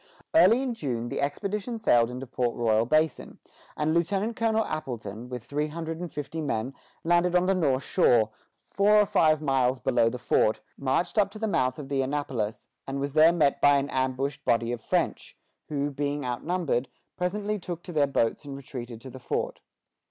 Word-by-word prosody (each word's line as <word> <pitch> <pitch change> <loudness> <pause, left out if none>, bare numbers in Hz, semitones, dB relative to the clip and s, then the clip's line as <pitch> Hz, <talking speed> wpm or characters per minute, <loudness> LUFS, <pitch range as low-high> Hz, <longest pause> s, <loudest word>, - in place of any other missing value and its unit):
Early 265 -6 +6
in 255 -3 -2
June 120 - -3
the - - -3
expedition 205 - -2
sailed 120 - +3
into 125 +2 -6
Port 120 -1 -1
Royal 115 -1 +2
Basin, 155 +3 0 0.4
and 155 +1 +1
Lieutenant 195 +7 0
Colonel 225 -1 +1
Appleton, 120 -5 -5
with 125 -3 -6
three 150 +4 -2
hundred 165 +1 -5
and 175 -1 -5
fifty 150 +2 -5
men, 130 -3 -2 0.3
landed 175 +1 +2
on 180 0 +4
the 195 - +3
north 140 -8 +1
shore, 110 -3 +3 0.2
four 205 +1 +1
or - - +3
five 155 -5 +3
miles 130 -2 +2
below 115 -1 +2
the 125 - -5
fort, 110 -3 +2 0.2
marched 165 +8 0
up 200 -1 +3
to 210 - -10
the 220 +1 -2
mouth 130 -9 +1
of 145 - -7
the 135 -1 0
Annapolis, 130 -5 -3 0.2
and 135 0 -3
was 140 0 -3
there 155 +2 +7
met 145 -5 +2
by 145 0 +6
an 140 0 -2
ambushed 130 +1 -1
body 115 0 +1
of 120 -2 -4
French, - - -2 0.3
who, 145 -1 -1
being 145 0 -2
outnumbered, 135 +1 -1 0.3
presently 205 +4 -2
took 175 -2 -6
to 175 - -8
their 145 -2 +3
boats 115 -2 0
and 140 -1 -7
retreated 120 -4 -8
to 130 +1 -9
the 130 - -10
fort. 120 - -3
145 Hz, 190 wpm, -27 LUFS, 125-175 Hz, 0.4 s, there